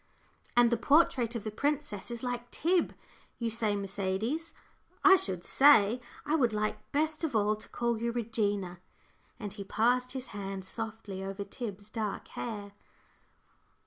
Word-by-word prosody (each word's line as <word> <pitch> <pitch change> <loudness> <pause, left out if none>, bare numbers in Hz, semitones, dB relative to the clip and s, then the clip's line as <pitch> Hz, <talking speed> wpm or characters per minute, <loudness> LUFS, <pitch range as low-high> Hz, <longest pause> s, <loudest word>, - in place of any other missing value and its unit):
"And 240 -1 +6
the 235 - +3
portrait 250 -3 +3
of 225 - -3
the 215 - -3
princess 280 -4 -1
is 235 0 -5
like 245 -1 -3
Tib, 350 +2 +1 0.4
you 230 -1 -1
say 220 -2 +1
Mercedes, 200 - -2 0.5
I 390 -1 +9
should 185 - -1
say? 250 -4 +6 0.2
I 295 - 0
would 250 -8 +3
like 215 0 -2
best 310 +2 0
of 295 -7 -1
all 210 0 +3
to 215 - -11
call 235 -2 -1
you 235 0 0
'Regina';" 205 -6 -1 0.6
and 205 -3 -5
he 205 -1 -6
passed 245 +5 +1
his 260 -1 -5
hand 195 -2 -5
softly 220 -2 -5
over 195 +1 -4
Tib's 210 -2 -7
dark 215 -3 -3
hair. 205 -4 -5
225 Hz, 150 wpm, -31 LUFS, 205-250 Hz, 0.6 s, I